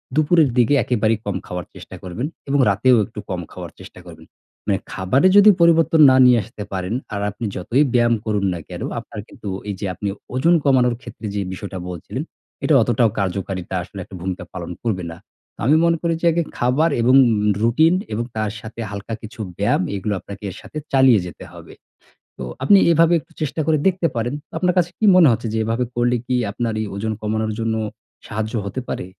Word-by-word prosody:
দুপুরের 155 -1 +4
দিকে 125 +3 +4
একেবারেই 110 -2 +1
কম 100 - -2
খাওয়ার 90 -2 -5
চেষ্টা - - -11
করবেন 95 +10 -4 0.2
এবং 145 - +2
রাতেও 120 +5 +4
একটু 110 -2 -10
কম 90 -2 -3
খাওয়ার - - -8
চেষ্টা - - -12
করবেন। - - -13 0.4
মানে 100 - +2
খাবারে 95 - +2
যদি 205 +1 +8
পরিবর্তন 165 -1 +4
না - - +5
নিয়ে 125 -2 +6
আসতে 110 -1 -9
পারেন, 95 +3 -3 0.2
আর 100 - -2
আপনি 105 +4 -6
যতই 115 +10 +1
ব্যায়াম 120 -1 +3
করুন 105 -2 0
না 85 - -5
কেনো, - - -5
আপনার - - -10
কিন্তু 100 - -9 0.2
এই 100 - -3
যে 100 - -3
আপনি 100 - -5 0.3
ওজন 165 +7 +3
কমানোর 125 -4 +3
ক্ষেত্রে 120 -2 -10
যে 100 - 0
বিষয়টা 95 0 -7
বলছিলেন, 90 - -5 0.4
এটা 155 - +2
অতটাও 120 0 +2
কার্যকারিতা 95 -1 -3
আসলে 95 +3 -10
একটা 95 - -12
ভূমিকা 90 -1 -4
পালন 90 -2 -6
করবে 100 -6 -1
না। 80 - -10 0.4
তো - - -33
আমি 150 - +5
মনে 165 -1 +2
করি, 170 -1 0
যে - - -1
আগে 170 +1 0
খাবার 130 +7 +2
এবং 125 +3 +4 0.5
রুটিন 155 +9 +4 0.2
এবং 115 +3 -1
তার 110 -1 -1
সাথে 115 +1 -10
হালকা 100 +3 -6
কিছু 110 +1 -11 0.2
ব্যায়াম, 100 -2 +1
এগুলো 100 +2 -2
আপনাকে 100 +2 -11
এর - - -11
সাথে - - -10 0.2
চালিয়ে 130 -5 +6
যেতে 90 - -9
হবে। - - -12 0.7
তো 65 - -5 0.2
আপনি 195 +8 +6
এভাবে 165 +1 +4
একটু - - -24
চেষ্টা 155 +1 -2
করে 155 -2 +3
দেখতে 185 -2 +2
পারেন। 120 +4 -1 0.2
আপনার 180 -1 +1
কাছে 175 -1 +1
কি 220 - -1
মনে 165 -5 +7
হচ্ছে, 115 0 -2
যে - - 0
এভাবে 115 +3 0
করলে 120 0 +1
কি 130 - -1 0.2
আপনার 115 +1 -2
এই 110 - -2
ওজন 110 +2 -2
কমানোর 110 0 -1
জন্য 115 0 -1 0.5
সাহায্য 110 +1 -4
হতে 130 +6 -4
পারে? - - -4
115 Hz, 195 wpm, -20 LUFS, 100-140 Hz, 0.7 s, যদি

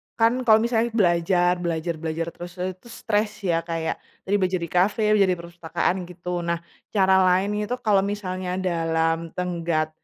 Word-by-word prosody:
kan 225 0 +4 0.2
kalau 220 0 +7
misalnya 235 -1 +1
belajar 175 -2 +3
belajar 170 0 -1
belajar 165 +1 -2
terus, 175 0 -9
eee, 185 - 0
itu 235 - -18
stres 210 -1 0 0.2
ya. 165 0 +1
Kayak 160 -1 -2 0.2
tadi 200 +2 0
belajar 185 -1 +1
di 170 - -4
kafe, 200 +4 +2
belajar 200 -3 +4
di - - -5
perpustakaan 170 +1 -2
gitu. 180 0 -9 0.2
Nah, 170 0 -1 0.3
cara 190 -2 +4
lain 185 +3 +3 0.2
itu 250 - -2
kalau 205 -3 +3
misalnya 185 -3 -3
dalam 165 -2 +1 0.2
tenggat 170 -3 -1
180 Hz, 165 wpm, -24 LUFS, 170-200 Hz, 0.3 s, kalau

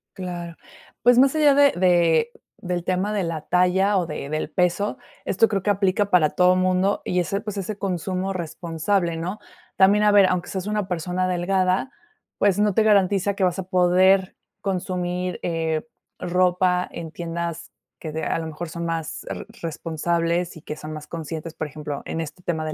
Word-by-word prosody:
Claro. 175 -2 -6 0.5
Pues 245 0 +6
más 270 +3 +5
allá 295 -2 +5
de 285 0 +6
de 175 +3 +3 0.3
del 180 -2 -3
tema 185 +4 -1
de 205 - 0
la 165 -2 -3
talla 190 +4 +2
o 170 - -2
de 150 -2 -5
del 155 0 -2
peso 180 +5 0 0.3
esto 225 +4 +3
creo 195 -3 -1
que 205 - -1
aplica 200 0 +1
para 165 -5 +4
todo 180 0 +4
mundo 185 +2 +1
y 180 - 0
ese 195 +3 -1
pues 210 -2 -6
ese 195 +2 -4
consumo 190 0 -2
responsable, 170 +1 -1
¿no? 185 +6 -4 0.4
También 200 +2 +5
a 210 - +5
ver 200 -1 +7
aunque 180 -1 -1
seas 190 0 -4
una 210 -2 -1
persona 180 +1 -1
delgada 185 +6 0 0.5
pues 200 -1 +3
no 210 -2 +3
te 220 - +3
garantiza 200 -1 +3
que 195 - -1
vas 180 +1 +1
a - - -2
poder 185 +1 +3 0.3
consumir, 180 -1 -2
eh, 165 +2 -1 0.3
ropa 180 0 +2
en 165 -2 -7
tiendas 170 0 -5 0.3
que 155 - -6
de 160 +1 -4
a - - 0
lo 160 - -4
mejor 160 +2 -6
son 170 +1 -5
más 165 -2 -3
re - - -5 0.2
responsables 170 +1 -1
y - - -12
que 150 - -6
son 155 0 -8
más 150 -1 -8
conscientes, 165 0 -6
por 155 - -3
ejemplo, 150 -1 -6
en 165 - -3
este 160 +3 -8
tema 160 -2 -2
de 155 - -3
180 Hz, 185 wpm, -23 LUFS, 165-195 Hz, 0.5 s, ver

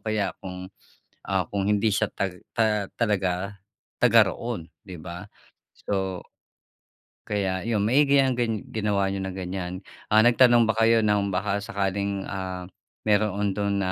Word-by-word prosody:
kaya 105 -5 -1
kung, 90 -1 -7 0.6
ah, 95 -4 -1
kung 100 -1 -2
hindi 105 +1 +2
siya 105 +1 0
tag 90 -2 -4
ta 110 -2 +1 0.2
talaga 100 -2 0 0.5
taga-roon, 115 -9 +3 0.2
’di 90 -3 -9
ba? 85 +3 -7 0.6
So, 95 -2 -2 1.1
Kaya 95 -3 -1
yun, 105 -2 0
maigi 140 +4 +4
yang 130 -1 +3
gan 115 -3 0
ginawa 105 -2 +1
niyo 95 0 -2
na 95 - -3
ganyan. 90 -1 -5 0.3
Ah, 110 - +6
nagtanong 120 -1 +6
ba 110 - +2
kayo 115 0 +4
ng 105 -1 +2
baka 100 +2 0
sakaling, 100 0 -2
ah, 95 -2 -5 0.4
meroon 105 -1 +2
dun 100 -1 0
na 95 - 0
100 Hz, 140 wpm, -25 LUFS, 95-110 Hz, 1.1 s, Ah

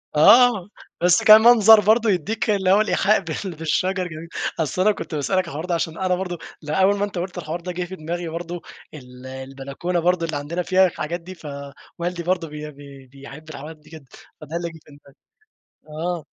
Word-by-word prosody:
آه 225 +4 +6 0.3
بس 180 +5 +4
كمنظر 220 0 +8
برضه 220 +2 +3
يدِّيك 210 +5 -1
اللي 190 -3 +2
هو 205 - +5
الإيحاء 215 -1 +2
بال 190 -4 -5
بالشجر 180 +4 -1
جميل، 160 0 -9 0.3
أصل 160 +3 -1
أنا 210 +3 +4
كنت 165 -5 -6
باسألك 150 +6 -1
على 185 - -2
الحوار 160 +1 -5
ده 180 -1 -1
عشان 165 -1 -3
أنا 185 -1 0
برضه 180 -1 -4 0.2
لأ، 155 +3 -1
أول 195 +2 +4
ما 200 - 0
أنتَ 200 -2 -8
قُلت 180 +1 -4
الحوار 170 0 -5
ده 180 +1 -5
جه 180 +1 -3
في 190 - -8
دماغي 170 +1 -5
برضه، 170 +1 -6 0.3
ال 125 -3 -12
البلكونة 135 +6 -4
برضه 175 0 +1
اللي 155 -3 -3
عندنا 165 +5 -4
فيها 190 +1 +4
الحاجات 170 0 -4
دي، 185 +2 -10
فوالدي 155 +4 -7
برضه 175 -1 -1
بي 150 0 -8
بي 140 -2 -14
بيحب 140 +4 -13
الحاجات 155 +1 -9
دي 150 - -21
جدًا، 155 -3 -12 0.4
فده 155 +2 -8
اللي 170 0 -2
جه 160 -1 -13
في - - -18
دماغي، 140 -1 -19 0.9
آه. 175 -3 -3
170 Hz, 200 wpm, -22 LUFS, 150-185 Hz, 0.9 s, كمنظر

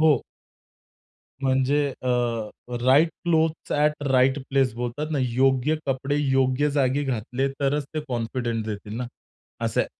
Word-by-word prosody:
हो. 155 -2 +6 1.3
म्हणजे 135 +2 +2 0.2
अ, 130 - -2 0.8
right 145 +6 +6 0.2
clothes 160 -1 +1
at 150 0 +1
right 130 +2 +4
place 135 -3 +2
बोलतात 125 +6 -4
ना, 150 - 0
योग्य 130 +4 +2
कपडे 135 +1 -1
योग्य 135 0 +2
जागी 140 0 +1
घातले 125 +1 -1
तरच 140 +1 +1
ते 155 - 0
कॉन्फिडन्स 115 -1 -2
देतील 105 0 -5
ना, 125 0 -3 0.6
असंय. - - +1
135 Hz, 125 wpm, -25 LUFS, 125-145 Hz, 1.3 s, हो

